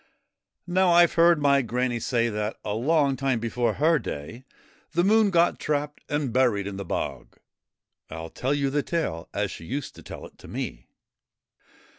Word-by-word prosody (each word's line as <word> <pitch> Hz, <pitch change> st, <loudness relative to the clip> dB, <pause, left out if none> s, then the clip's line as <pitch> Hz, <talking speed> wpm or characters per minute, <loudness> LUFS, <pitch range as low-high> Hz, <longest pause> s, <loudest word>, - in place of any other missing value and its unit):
Now, 185 Hz, +1 st, +2 dB
I 175 Hz, 0 st, +8 dB
've -, -, -4 dB
heard 170 Hz, -1 st, +5 dB
my 140 Hz, -1 st, +4 dB
Granny 125 Hz, 0 st, -1 dB
say 120 Hz, -1 st, +1 dB
that 105 Hz, -1 st, -3 dB
a 105 Hz, -, -1 dB
long 140 Hz, +4 st, +2 dB
time 130 Hz, -2 st, 0 dB
before 120 Hz, +1 st, 0 dB
her 155 Hz, +2 st, +3 dB
day 110 Hz, -, -7 dB, 0.5 s
the 175 Hz, +1 st, +2 dB
Moon 215 Hz, +2 st, +4 dB
got 170 Hz, -2 st, +3 dB
trapped 150 Hz, 0 st, -2 dB
and 145 Hz, -5 st, -1 dB
buried 120 Hz, -6 st, +2 dB
in 100 Hz, -1 st, -5 dB
the 100 Hz, -, -4 dB
bog. -, -, -4 dB, 0.7 s
I -, -, -7 dB
'11 80 Hz, 0 st, -7 dB
tell 130 Hz, +3 st, -1 dB
you 140 Hz, -1 st, 0 dB
the 145 Hz, +1 st, +1 dB
tale 145 Hz, -, -3 dB
as -, -, -2 dB
she 80 Hz, -, -9 dB
used 140 Hz, -, -4 dB
to -, -, -13 dB
tell -, -, -9 dB
it -, -, -16 dB
to -, -, -13 dB
me. -, -, -5 dB
135 Hz, 185 wpm, -26 LUFS, 115-160 Hz, 0.7 s, I